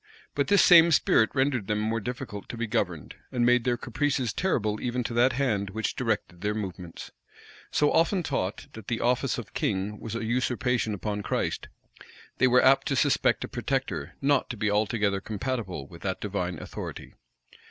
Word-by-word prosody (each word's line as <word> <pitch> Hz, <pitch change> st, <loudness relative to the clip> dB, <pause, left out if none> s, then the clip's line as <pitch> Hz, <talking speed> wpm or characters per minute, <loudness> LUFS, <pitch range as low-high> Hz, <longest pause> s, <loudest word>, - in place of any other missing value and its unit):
But 140 Hz, -1 st, 0 dB
this 200 Hz, -, +5 dB
same 170 Hz, -1 st, +8 dB
spirit 110 Hz, -6 st, +4 dB
rendered 130 Hz, -6 st, +1 dB
them 105 Hz, -1 st, 0 dB
more 110 Hz, +2 st, 0 dB
difficult 120 Hz, -2 st, -6 dB
to 120 Hz, -, -6 dB
be 120 Hz, -, -1 dB
governed, 90 Hz, -, -2 dB, 0.2 s
and 120 Hz, -1 st, +1 dB
made 125 Hz, -1 st, +4 dB
their 120 Hz, -1 st, +1 dB
caprices 130 Hz, -1 st, -1 dB
terrible 110 Hz, -, 0 dB
even 125 Hz, 0 st, -1 dB
to 115 Hz, -, -4 dB
that 120 Hz, +2 st, +4 dB
hand 110 Hz, -7 st, 0 dB
which 110 Hz, +3 st, -3 dB
directed 105 Hz, -7 st, -2 dB
their 105 Hz, +1 st, -1 dB
movements. 90 Hz, -5 st, -6 dB, 0.6 s
So 150 Hz, -, +2 dB
often 175 Hz, +2 st, +2 dB
taught, 105 Hz, -10 st, -2 dB
that 110 Hz, -3 st, -10 dB
the 115 Hz, -, -1 dB
office 125 Hz, +2 st, +1 dB
of 120 Hz, -5 st, -8 dB
king 100 Hz, +1 st, -2 dB
was 115 Hz, 0 st, -6 dB
a 115 Hz, -, -3 dB
usurpation 125 Hz, -1 st, 0 dB
upon 105 Hz, +1 st, -3 dB
Christ, -, -, -2 dB, 0.7 s
they 130 Hz, -, +5 dB
were 125 Hz, 0 st, +5 dB
apt 135 Hz, +1 st, +5 dB
to 135 Hz, -, 0 dB
suspect 140 Hz, +1 st, +2 dB
a -, -, -4 dB
protector 120 Hz, -, -3 dB
not 140 Hz, -1 st, +2 dB
to 120 Hz, -, -5 dB
be 105 Hz, 0 st, 0 dB
altogether 105 Hz, -1 st, +1 dB
compatible 110 Hz, -, -4 dB
with 85 Hz, +4 st, -13 dB
that 95 Hz, 0 st, -2 dB
divine 90 Hz, -4 st, -3 dB
authority. -, -, -7 dB
115 Hz, 180 wpm, -27 LUFS, 105-130 Hz, 0.7 s, same